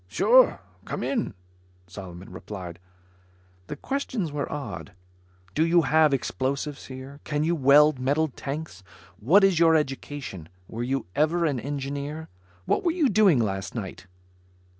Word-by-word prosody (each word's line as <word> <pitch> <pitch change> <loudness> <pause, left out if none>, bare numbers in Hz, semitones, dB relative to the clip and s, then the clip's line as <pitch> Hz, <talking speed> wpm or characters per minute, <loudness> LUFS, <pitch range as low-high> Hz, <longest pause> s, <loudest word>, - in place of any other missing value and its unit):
"Sure, - - +4 0.2
come - - -5
in," 230 - -2 0.5
Solomon 90 0 -10
replied. 90 -2 -8 0.9
The - - -5
questions 245 - -3
were 145 -1 -3
odd: 100 - -6 0.6
Do 155 - +2
you 170 +1 +4
have 155 -1 +4
explosives 135 +1 -2
here? 130 +2 -9
Can 150 0 -1
you 165 +2 +1
weld 145 0 +5
metal 145 +5 +1
tanks? 140 - -6 0.4
What 170 - +5
is 190 -4 +4
your 165 -1 +5
education? 135 - -3 0.2
Were 115 - -6
you 135 +3 -1
ever 165 +3 +2
an 140 -5 0
engineer? 145 +3 -5 0.4
What - - +1
were 350 - +2
you 325 -5 +2
doing 200 -7 +5
last 95 -5 -2
night? - - -6
145 Hz, 140 wpm, -26 LUFS, 130-160 Hz, 0.9 s, weld